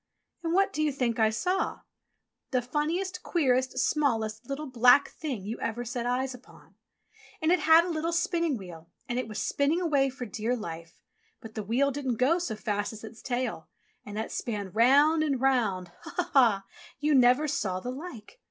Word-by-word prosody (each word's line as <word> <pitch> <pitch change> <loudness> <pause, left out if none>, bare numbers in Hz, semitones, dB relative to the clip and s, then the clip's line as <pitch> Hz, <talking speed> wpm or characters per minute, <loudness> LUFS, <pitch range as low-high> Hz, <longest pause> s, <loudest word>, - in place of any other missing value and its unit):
And 335 0 -1
what 390 +1 +3
do 310 - -1
you 305 -1 +2
think 245 -4 -1
I 220 -1 +5
saw? 360 - -1 0.7
The 255 -2 0
funniest, 330 +8 -2
queerest, 260 -6 +1
smallest, 225 -6 0
little, 280 +2 -3
black 250 +1 +5
Thing 260 -11 -5
you 220 +3 -5
ever 240 +2 -3
set 240 0 -3
eyes 255 +1 -1
upon. 250 0 -16 0.7
And 315 +1 +1
it 360 - +4
had 320 +2 +6
a - - -4
little 330 0 -1
spinning 335 -4 0
wheel 170 -4 -11 0.2
and 245 +1 -1
it 255 - -3
was 215 -1 -7
spinning 285 +4 +1
away 285 -6 +2
for 255 -1 -7
dear 230 +2 -2
life, 170 -6 -8 0.4
but 225 -1 -11
the 215 - -4
wheel 245 +7 +1
didn't 265 -3 -2
go 275 +9 +2
so 295 -11 -3
fast 205 0 -2
as 215 - -11
its 220 +1 -10
tail, 245 -9 -3 0.4
and 205 0 -8
that 220 - -3
span 205 -5 -4
round 280 - +5
and 285 -4 0
round 220 -9 +1
— - - -28
ho - - -8
ho - - +1
ha - - -14
ha! 225 -8 +4 0.2
— - - -20
you 300 +1 +2
never 255 +3 +5
saw 195 -10 -1
the 245 +6 -5
like. 285 - -9
255 Hz, 200 wpm, -28 LUFS, 220-300 Hz, 0.7 s, had